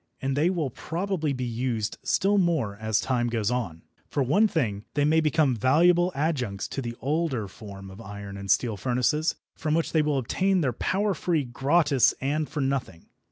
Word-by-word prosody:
And 135 0 -1
they 155 +5 +3
will 165 -8 -1
probably 165 - -2
be 130 -2 -3
used 120 -2 -2
still 200 +1 +2
more 160 - +1
as 110 0 0
time 120 -2 0
goes 115 -2 0
on. 105 -10 -3 0.3
For 140 - 0
one 195 - +4
thing, 115 - -1
they 145 -1 +2
may 160 +2 +4
become 155 -4 +2
valuable 170 - +4
adjuncts 130 - -1
to 135 - -4
the 120 -2 -5
older 140 -6 -1
form 95 -1 -10
of 95 +4 -11
iron 100 -1 -8
and 100 0 -7
steel 115 -1 +2
furnaces, 125 - +1 0.2
from 155 -1 -1
which 165 - 0
they 160 - +3
will 150 -2 +1
obtain 185 +9 +1
their 130 -5 0
power 200 - 0
free, 165 -4 0
gratis 135 +1 +2
and 150 +3 -1
for 150 -1 -3
nothing. 135 -11 -3
135 Hz, 185 wpm, -26 LUFS, 115-160 Hz, 0.3 s, one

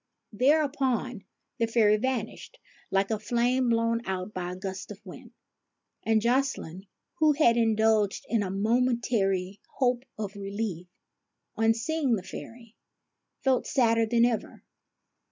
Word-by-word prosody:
Thereupon 260 -4 +1 0.3
the 230 - +2
fairy 220 -2 +4
vanished 255 - -4 0.3
like 195 +2 +1
a 220 - 0
flame 245 +3 +1
blown 230 0 +1
out 190 +2 -3
by 180 -1 -4
a - - -7
gust 190 0 -6
of - - -9
wind; - - -11 0.7
and 220 -1 +1
Jocelyne, 235 -8 -1 0.3
who 310 -1 +5
had 280 -6 +4
indulged 220 -3 +2
in 230 -2 +1
a 195 - -2
momen 235 +5 +1
tary 195 -4 0 0.2
hope 250 -2 +1
of 205 -2 -5
relief, 200 -3 -4 0.7
on 225 0 +3
seeing 275 +1 0
the 190 - -5
fairy, 230 +3 -10 0.7
felt 260 -2 +2
sadder 230 -3 +2
than 235 +1 +4
ever. 240 -2 -3
225 Hz, 135 wpm, -27 LUFS, 205-245 Hz, 0.7 s, who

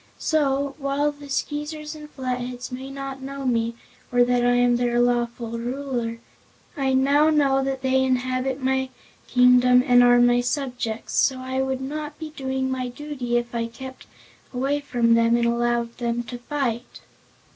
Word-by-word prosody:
So, 280 -3 0
while 280 +1 0
the 285 -1 -13
Skeezers 300 +2 -3
and 300 -1 -10
Flatheads 250 -2 -4
may 260 +2 -6
not 275 -1 -6
know 275 0 -6
me 230 -2 0 0.4
or 245 0 +5
that 245 0 +2
I 245 0 +3
am 245 0 +3
their 240 0 +1
lawful 235 -1 0
Ruler, 245 -2 -3 0.6
I 270 -3 0
now 285 +4 +4
know 275 -3 +3
that 265 -1 -3
they 265 0 +3
inhabit 255 +1 -1
my 265 0 +1 0.4
kingdom 250 0 +5
and 245 -3 +6
are 245 0 +6
my 245 0 +4
subjects, 245 -3 -3
so 265 - +3
I 260 +1 -2
would 265 0 -2
not 295 +2 -5
be 315 -1 -7
doing 265 -2 -2
my 255 -1 -2
duty 250 -2 -3
if 240 0 -3
I 230 -1 -1
kept 260 +3 -10 0.4
away 270 +3 0
from 240 -5 +1
them 230 0 +4
and 235 - +1
allowed 235 0 0
them 235 0 -1
to 245 0 -8
fight." 245 -3 -3
255 Hz, 165 wpm, -24 LUFS, 245-275 Hz, 0.6 s, and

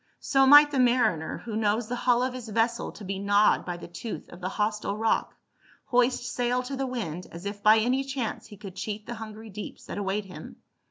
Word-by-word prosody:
" - - -48
So 270 -1 +6
might 290 +1 +9
the 275 - 0
mariner, 235 -10 +2
who 225 -3 -4
knows 215 +1 +1
the 245 - -2
hull 245 0 +2
of 255 0 -1
his 245 -3 -7
vessel 230 +2 0
to 210 - -11
be 195 0 -4
gnawed 205 +1 +3
by 175 -1 -4
the - - -9
tooth 205 +6 -7
of 175 - -12
the 185 - -2
hostile 210 0 -1
rock, 225 +1 0 0.5
hoist 250 0 +2
sail 245 0 -1
to 270 +2 -5
the 270 0 -2
wind, 180 -9 -4
as 170 +3 -9
if 205 0 -5
by 215 +2 +6
any 250 +5 +1
chance 270 -4 -4
he 205 - -12
could 195 -2 -10
cheat 210 +2 -5
the 240 - -5
hungry 220 0 -9
deeps 210 +2 -8
that - - -5
await 200 +1 -2
him. 185 - -10
220 Hz, 225 wpm, -27 LUFS, 205-245 Hz, 0.5 s, might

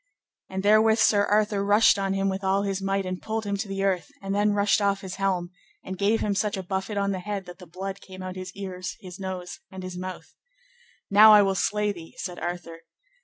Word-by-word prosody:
And 190 0 -4
therewith 215 +2 +5
Sir 205 -3 +4
Arthur 210 -1 +2
rushed 205 0 +5
on 195 0 0
him 195 0 0
with 195 +1 -2
all 195 +1 +2
his 195 -1 -2
might 195 0 0
and 185 0 -4
pulled 220 0 -3
him 200 0 -1
to 205 +2 -4
the 195 0 -3
earth, 185 -5 0
and 195 0 -4
then 205 +1 +2
rushed 205 +1 +2
off 200 -1 +1
his 190 -2 -7
helm, 185 -3 -1 0.3
and 190 - -5
gave 205 +4 +1
him 205 - 0
such 205 0 0
a 190 - -4
buffet 190 +3 -3
on 200 0 +1
the 190 - -2
head 200 0 -4
that 175 0 -11
the 180 - -12
blood 190 +3 -6
came 185 -1 -10
out 185 - -4
at 185 - -8
his 185 -1 -7
ears, 185 -2 -6
his 185 -1 -10
nose, 185 +1 -5
and 190 -1 -8
his 185 -1 -6
mouth. 185 0 -7 0.8
Now 210 +1 +9
will 195 - +2
I - - 0
slay 210 +2 0
thee, 170 -4 -11
said 180 -2 -5
Arthur. 175 -1 -5
195 Hz, 235 wpm, -26 LUFS, 185-205 Hz, 0.8 s, Now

